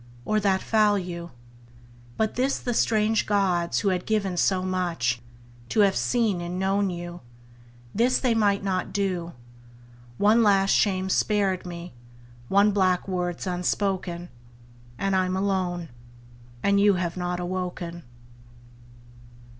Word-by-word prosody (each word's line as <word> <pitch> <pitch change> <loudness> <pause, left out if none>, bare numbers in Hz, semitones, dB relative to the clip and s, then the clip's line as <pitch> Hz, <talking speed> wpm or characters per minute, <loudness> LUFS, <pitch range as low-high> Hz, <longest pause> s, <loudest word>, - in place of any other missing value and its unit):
or 215 0 +1
that 195 -2 +1
foul 210 -2 +3
you? 175 -2 -5 0.9
But 220 -1 0
this 260 +3 0
the 245 - -3
strange 220 -1 +2
gods, 185 -4 +1
who 200 - +1
had 180 -1 -2
given 200 -4 0
so 185 +1 +1
much, 170 -10 -1 0.5
To 215 - +3
have 195 -2 +4
seen 225 -7 +1
and 175 +1 -4
known 195 +1 +1
you, 175 0 -6 0.7
this 245 +4 +3
they 250 -3 +2
might 205 -3 +2
not 185 -2 -1
do. 185 -4 -2 0.8
One 215 +3 +4
last 195 -2 +4
shame's 190 -2 +2
spared 195 -4 +1
me, 175 0 -8 0.5
one 200 +5 +4
black 185 -2 +1
word's 180 -2 -2
unspoken; 180 -1 -2 0.7
And 195 +5 0
I'm 185 0 +1
alone; 185 -4 -1 0.7
and 200 0 +3
you 200 -1 +5
have 175 -2 -2
not 180 -1 -3
awoken. 180 -1 -4
190 Hz, 130 wpm, -25 LUFS, 175-205 Hz, 0.9 s, you